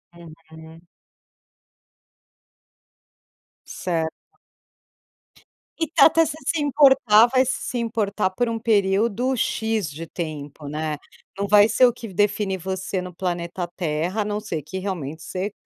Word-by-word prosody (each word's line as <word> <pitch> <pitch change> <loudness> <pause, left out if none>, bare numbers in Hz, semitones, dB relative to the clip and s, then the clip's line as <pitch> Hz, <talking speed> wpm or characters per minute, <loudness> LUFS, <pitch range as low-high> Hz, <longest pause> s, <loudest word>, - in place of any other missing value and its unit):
Uhum. 160 -1 -14 2.8
Certo. 165 -3 -2 1.7
E 325 - 0
tá 320 - +5
até 325 +1 +5
se 305 - -4
se 325 -3 +1
importar, 265 -6 +5
vai 255 +1 +3
se 260 0 -3
importar 215 -4 -1
por 240 +5 -1
período 220 +4 +1
"X" 220 -5 -1
de 155 +3 -7
tempo, 150 -4 -6
né, 150 +1 -3 0.4
não 200 0 -2
vai 205 +1 +6
ser 255 - +5
o 245 - +3
que 225 -4 -9
define 205 0 +1
você 190 +1 -3
no 180 0 -8
planeta 175 0 -3
Terra, 170 +4 -1
a - - -2
não 210 0 -2
ser 180 -8 -4
que 155 +6 -7
realmente 165 -6 -5
você 190 +3 -4
195 Hz, 125 wpm, -23 LUFS, 165-225 Hz, 2.8 s, vai